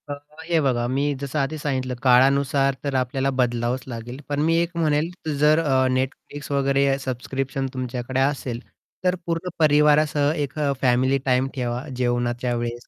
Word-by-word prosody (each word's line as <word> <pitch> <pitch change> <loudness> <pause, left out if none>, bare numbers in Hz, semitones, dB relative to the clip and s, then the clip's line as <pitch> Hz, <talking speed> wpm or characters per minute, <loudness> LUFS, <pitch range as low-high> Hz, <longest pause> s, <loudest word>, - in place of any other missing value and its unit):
अ, - - -2 0.3
हे 165 0 +1
बघा, 125 -4 +1
मी 140 +3 0
जसं 140 +2 -2
आधी 140 +3 -1
सांगितलं, 130 -4 -2
काळानुसार 135 +2 +4
तर 140 -1 -2
आपल्याला 130 +1 0
बदलावंच 120 +1 0
लागेल. 120 +1 -7
पण 145 0 -1
मी 165 +2 +2
एक 170 0 -2
म्हणेल, 155 0 +1 0.3
जर 150 +2 +5
अ, 135 -5 +2
Netflix 140 +2 -5
वगैरे 140 0 +2
सबस्क्रिप्शन 135 +1 -3
तुमच्याकडे 130 0 -3
असेल, 135 -3 -1 0.4
तर 180 0 +2
पूर्ण 170 +2 -2
परिवारासह 150 -1 +4
एक 145 -4 -3 0.3
फॅमिली 130 +1 +3
टाईम 130 0 +2
ठेवा. 125 -1 -2
जेवणाच्या 120 0 -1
वेळेस 120 0 -4
135 Hz, 150 wpm, -23 LUFS, 125-145 Hz, 0.4 s, जर